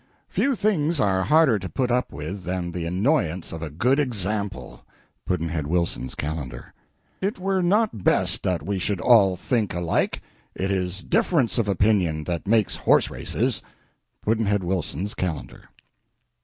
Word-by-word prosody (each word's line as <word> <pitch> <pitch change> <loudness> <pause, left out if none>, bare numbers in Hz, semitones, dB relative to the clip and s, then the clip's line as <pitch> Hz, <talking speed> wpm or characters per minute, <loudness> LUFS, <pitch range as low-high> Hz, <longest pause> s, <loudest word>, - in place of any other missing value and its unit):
Few 275 -1 +1
things 170 -8 +1
are 95 -4 +2
harder 145 0 +4
to 95 -1 -6
put 125 -2 -1
up 125 +1 0
with 80 +7 -6
than 90 -1 -3
the 85 -1 -4
annoyance 95 - 0
of 80 - -6
a 80 - -4
good 125 - +1
example. 105 - -2 0.4
Pudd'nhead 80 -4 -1
Wilson's 85 -5 -1
Calendar. 70 -5 -5 0.5
It 200 +3 -1
were 190 0 0
not 190 - +1
best - - +2
that 90 -5 -1
we 100 -1 -1
should 95 +1 -1
all 100 -6 +5
think 105 +1 -1
alike; 85 -1 0 0.4
it 95 +1 -1
is 95 0 -2
difference 170 - +1
of 110 - +1
opinion 95 -6 +2
that 85 +2 -4
makes 110 -1 +2
horse - - +3
races. - - -1 0.6
Pudd'nhead 105 -3 +1
Wilson's 90 +1 -2
Calendar. 85 -5 -4
95 Hz, 145 wpm, -24 LUFS, 85-125 Hz, 0.6 s, all